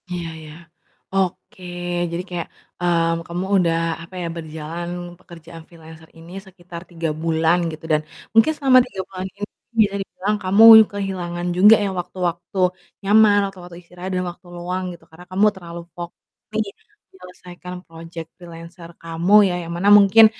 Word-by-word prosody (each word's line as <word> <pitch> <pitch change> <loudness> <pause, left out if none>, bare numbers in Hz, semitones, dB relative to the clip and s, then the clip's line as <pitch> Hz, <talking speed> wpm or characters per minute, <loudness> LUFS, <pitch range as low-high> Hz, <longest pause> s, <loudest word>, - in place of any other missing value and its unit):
Iya 175 -2 -4
iya, 155 -1 -11 0.6
oke 190 -1 -2 0.5
jadi 170 +2 -3
kayak, 175 -2 -4 0.3
mmm, 165 -1 +1
kamu 175 +2 -3
udah, 170 -3 +2 0.3
apa 180 +3 -13
ya, 170 - -3
berjalan 160 +1 -6 0.3
pekerjaan 165 -1 -13
freelancer 160 -1 -15
ini 165 +1 -13 0.2
sekitar 175 -2 -11
3 165 -2 -3
bulan 165 +1 +2
gitu 155 0 -10
dan 155 0 +3 0.3
mungkin 225 +7 +5
selama 265 -2 +5
3 195 -7 -6
bulan 185 -1 -6
ini - - -20 0.4
bisa 200 -1 +2
dibilang 200 +2 -3
kamu 195 +4 +4 0.3
kehilangan 180 -3 -4
juga 210 +4 +8
ya 200 - -1
waktu-waktu 175 0 -4 0.5
nyaman, 210 0 +6
waktu-waktu 180 -3 -11
istirahat 180 +1 -9
dan 180 - -1
waktu 175 +1 -20
luang 180 +2 -4
gitu. 170 - -15
Karena 160 +2 -14
kamu 195 +3 +3
terlalu 170 -2 -9
fokus 175 0 -7 0.4
nih 220 0 0 0.5
menyelesaikan 180 -1 -12
project 165 0 -9
freelancer 170 0 -12
kamu 165 +4 +1
ya, 180 - -1
yang 165 - -7
mana 180 +4 -1
mungkin, 205 +2 +8
175 Hz, 150 wpm, -21 LUFS, 165-190 Hz, 0.6 s, juga